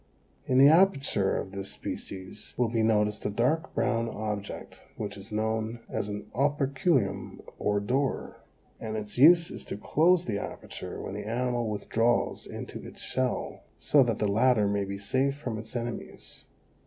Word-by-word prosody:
In 130 - +2
the 135 +1 +9
aperture 150 - +4
of 95 - -4
this 95 0 -5
species 95 -1 -7
will 125 -2 +2
be 115 0 +1
noticed 105 -1 +2
a - - 0
dark 125 +10 0
brown 115 -2 +1
object 105 -2 -5 0.2
which 100 -2 -4
is 100 +2 -10
known 110 +1 -1
as 100 - -2
an 105 0 -5
operculum 140 - +1 0.2
or 105 0 +1
door, 130 +7 -1 0.4
and 110 -1 -4
its 105 +2 -5
use 170 +4 +7
is - - -7
to - - -5
close 175 - +3
the 100 -2 -1
aperture - - -7
when - - -5
the 105 +1 -5
animal 120 0 0
withdraws 115 +3 0
into - - -7
its - - -9
shell, 130 -1 -2 0.2
so 145 - +4
that 120 -4 +2
the 105 - +1
latter 110 +1 +3
may 100 0 0
be 100 0 -5
safe 130 +7 0
from 120 -6 -4
its 110 +3 -9
enemies. 120 -1 -6
115 Hz, 165 wpm, -28 LUFS, 105-130 Hz, 0.4 s, the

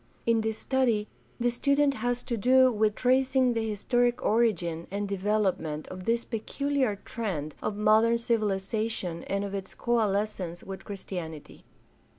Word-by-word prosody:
In 230 -1 +3
this 220 0 -2
study 235 -6 +1 0.3
the 240 0 +2
student 280 +3 +2
has 245 0 -2
to 235 - -2
do 255 +3 +5
with 215 -1 +1
tracing 255 0 +3
the 225 -1 -1
historic 240 +3 +1
origin 175 -8 +1
and 200 +1 -3
development 190 -6 -1
of 185 0 -8
this 235 +1 +1
peculiar 260 +1 -1
trend 165 -10 -3
of 205 - -2
modern 220 +2 +4
civilization 215 -4 -1
and 200 +1 -1
of 200 - -6
its 195 -1 -5
coalescence 205 -6 -1
with 195 0 -8
Christianity. 175 -6 -7
215 Hz, 140 wpm, -28 LUFS, 195-240 Hz, 0.3 s, do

